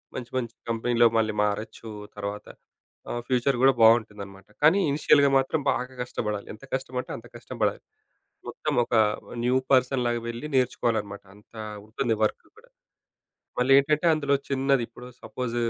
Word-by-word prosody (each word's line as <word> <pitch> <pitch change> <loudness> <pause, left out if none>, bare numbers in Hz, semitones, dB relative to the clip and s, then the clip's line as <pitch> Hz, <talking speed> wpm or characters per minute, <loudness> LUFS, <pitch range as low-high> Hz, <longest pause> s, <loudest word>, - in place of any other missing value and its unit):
మంచి 125 -2 -6
మంచి 120 -3 -3 0.2
కంపెనీ‌లో 115 +1 +3
మళ్ళీ 110 -1 +1
మారొచ్చు 105 +2 -3 0.3
తర్వాత. 105 0 -5 0.6
ఆహ్, 120 - -3
ఫ్యూచర్ 125 +1 +1
గూడా 135 +1 +6
బావుంటుందన్నమాట. 105 -4 +2 0.2
కానీ, 160 +6 +6
ఇనీషియల్‌గా 140 0 +4
మాత్రం 135 +4 0
బాగా 125 +1 -3
గష్టబడాలి, 105 -4 -4
ఎంత 110 - -15
కష్టమంటే, 130 -1 -3
అంత 115 - -13
కష్టంబడాలి. 115 -3 -2 0.7
మొత్తం - - -3
ఒక 120 - -7 0.5
న్యూ 125 +2 +3 0.2
పర్సన్‌లాగా 125 -2 +2
వెళ్లి 120 +6 -5
నేర్చుకోవాలన్నమాట. 110 -5 0
అంత 105 +2 -21 0.3
ఉంటుంది 115 +2 -1
వర్క్ 110 - 0
అక్కడ. - - -21 1.0
మళ్ళీ 130 +2 +3
ఏంటంటే, 150 +4 +1
అందులో 140 -2 +1
చిన్నది 135 -2 +1
ఇప్పుడు 120 +2 -12
సపోజ్, 125 -2 -4
120 Hz, 135 wpm, -26 LUFS, 110-130 Hz, 1.0 s, గూడా